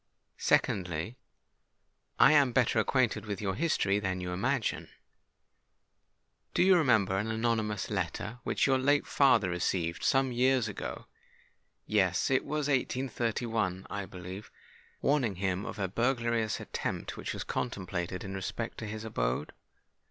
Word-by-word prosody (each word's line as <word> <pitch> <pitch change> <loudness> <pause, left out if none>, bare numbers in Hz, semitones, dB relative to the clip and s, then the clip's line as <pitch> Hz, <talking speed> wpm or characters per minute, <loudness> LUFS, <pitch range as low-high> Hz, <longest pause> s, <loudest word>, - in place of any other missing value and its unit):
Secondly, 90 +2 +1 1.0
I 135 - +7
am 140 -5 +4
better 125 -3 +3
acquainted 110 -3 +1
with 100 -2 -3
your 95 -2 -1
history 105 - +1
than 95 -2 -2
you 90 0 -4
imagine. 120 +6 -1 1.7
Do - - +4
you 190 0 +6
remember 110 - +3
an 105 +2 -2
anonymous 110 -3 -1
letter 115 +4 -3
which - - +1
your 135 -1 +3
late 145 +2 +3
father 135 -8 +4
received—some 90 +9 +1
years 125 -1 +2
ago,—yes—it 105 +2 -2
was 150 -1 -2
in 140 -2 +4
1831, 115 -7 -2
I 100 -1 -4
believe,—warning 100 +6 -4
him 95 +1 -2
of - - -6
a 100 -2 -1
burglarious 115 0 0
attempt - - -4
which - - -5
was - - -4
contemplated 90 -5 -3
in 95 - -6
respect 95 +4 -4
to 110 - -5
his 110 +1 -5
abode?" 60 - -2
110 Hz, 125 wpm, -30 LUFS, 95-130 Hz, 1.7 s, I